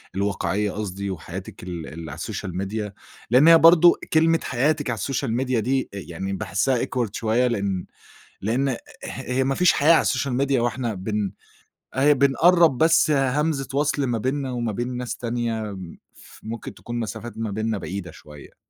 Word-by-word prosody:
الواقعية 100 0 -1
قصدي 100 -1 -4
وحياتِك 90 +2 -8
ال 85 -3 -6
ال 80 0 -8
على - - -7
السوشيال 90 -1 -5
ميديا؟ 105 +1 -3 0.4
لإن 130 +6 +6
هي 165 0 +9
برضه 170 +1 +7 0.2
كلمة 165 +1 +4
حياتِك 145 +2 0
على 115 - -1
السوشيال 130 +3 -2
ميديا 125 -1 0
دي 130 +4 0
أ - - -6
يعني 95 +1 -5
باحسّها 105 +6 0
awkward 120 -5 -2
شوية 115 +3 +1
لإن 100 -5 -2 0.6
لإن 120 +7 0
اه 125 - -2 0.3
هي 125 +1 -2
ما 135 +1 0
فيش 180 +3 +4
حياة 155 +4 +5
على 165 - +5
السوشيال 135 -2 0
ميديا 135 0 +1
وإحنا 120 -1 -1
بن 100 0 -2 0.6
أهي 145 +3 +5
بنقرّب 155 +2 +4
بس 160 0 +4
همزة 140 +1 +1
وَصْل 145 0 +1
ما 120 -3 -1
بيننا 130 +3 -2
وما 120 -2 -2
بين 120 +4 -3
ناس 125 -1 -4
تانية 115 -1 -2
م 95 -4 -9 0.2
ف - - -16
ممكن 115 0 -6
تكون 120 0 -6
مسافات 115 +1 -6
ما 110 -2 -3
بيننا 110 +1 -1
بعيدة 95 -2 -6
شوية. 75 -2 -14
120 Hz, 175 wpm, -23 LUFS, 100-135 Hz, 0.6 s, هي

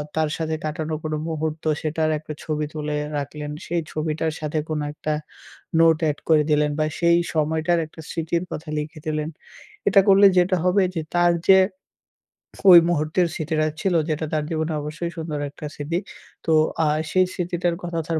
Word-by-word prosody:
তার 160 -1 +1
সাথে 160 -1 -2
কাটানো 155 0 -3
কোনো 155 -1 -2
মুহূর্ত, 155 0 -3 0.2
সেটার 155 0 0
একটা 155 0 -7
ছবি 155 -1 -2
তুলে 150 -1 -3 0.2
রাখলেন। 150 +1 -5
সেই 170 0 -1
ছবিটার 155 +1 -1
সাথে 155 0 -1
কোনো 155 -1 -1
একটা, 155 +1 -3 0.7
নোট 165 -1 +5
add 145 - -4
করে 155 -2 +5
দিলেন 150 0 +3
বা - - +3
সেই 170 0 +4 0.2
সময়টার 160 +2 +1
একটা 160 - -13
স্মৃতির 170 0 -1
কথা 155 +1 -6
লিখে 155 +1 -6
দিলেন। 155 0 -2 0.6
এটা 200 - +6
করলে 195 +1 +7
যেটা 180 +1 +3
হবে 185 +2 +3
যে, 165 - -1 0.2
তার 175 0 +4 0.2
যে 190 0 +9 1.1
কই 180 -3 +11
মুহূর্তের 165 +2 +1
স্মৃতিটা 155 -1 0
ছিল 190 - +1 0.2
যেটা 155 +1 -1
তার 155 -1 +1
জীবনে 160 -1 -1
অবশ্যই 155 +3 -4
সুন্দর 160 -2 -4
একটা 145 - -10
স্মৃতি, 155 +4 -2 0.5
তো 165 - +1 0.3
আ - - +2 0.2
সেই 185 0 +4
স্মৃতিটার 175 -1 -1
কথা 170 -1 -3
তার 165 -1 0
160 Hz, 170 wpm, -23 LUFS, 155-170 Hz, 1.1 s, কই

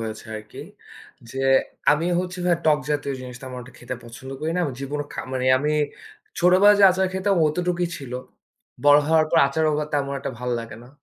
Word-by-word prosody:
হয়েছে 110 -1 -6
আরকি 110 0 -11 0.7
যে, 135 - -10 0.6
আমি 155 +3 0
হচ্ছি 185 0 -6
ভাই 175 -1 +3
টক 150 -1 +5
জাতীয় 145 -1 -1
জিনিসটা 125 0 -9
তেমন 130 -1 -7
একটা 125 +1 -15
খেতে 125 +1 -6
পছন্দ 120 +3 -10
করি 155 - -2
না। - - +1
আমি 145 - -3
জীবনে 145 +2 -3
খা - - -4
মানে 130 -1 -1
আমি 150 +3 0 0.7
ছোটবেলায় 185 +4 +6
যে - - +8
আচার 190 +1 +1
খেতাম 190 +1 +1
অতটুকুই 175 +2 -1
ছিল। 135 -5 -9 0.7
বড় 145 0 +8
হওয়ার 160 0 +3
পর 165 - +4
আচারও 155 +2 +1
বা 150 - -1
তেমন 140 -1 -1
একটা - - -4
ভালো 125 0 -2
লাগে 115 -2 -9
না। - - -15
150 Hz, 195 wpm, -23 LUFS, 130-175 Hz, 0.7 s, যে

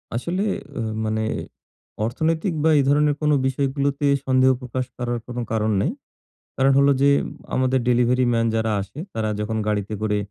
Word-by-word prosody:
আসলে 170 - -1 0.4
আ - - -1 0.2
মানে 110 0 -1 0.8
অর্থনৈতিক 160 - -1
বা 160 - +4
এই 140 - +4
ধরণের 145 0 +3
কোনো 150 0 +3
বিষয়গুলোতে 140 +1 -1 0.2
সন্দেহ 130 0 +4
প্রকাশ 125 +1 -3
করার 120 -1 -2
কোনো 125 0 -4
কারণ 110 -1 +1
নেই। 165 - 0 0.7
কারণ 135 +1 +4
হলো 140 0 +5
যে, 140 - +5 0.5
আমাদের 130 0 +2
ডেলিভারিম্যান 120 -1 +2
যারা 110 0 0
আসে, 100 +9 -9
তারা 110 -1 -1
যখন 110 +1 -2
গাড়িতে 105 0 -1
করে 105 -1 0
130 Hz, 150 wpm, -22 LUFS, 115-140 Hz, 0.8 s, হলো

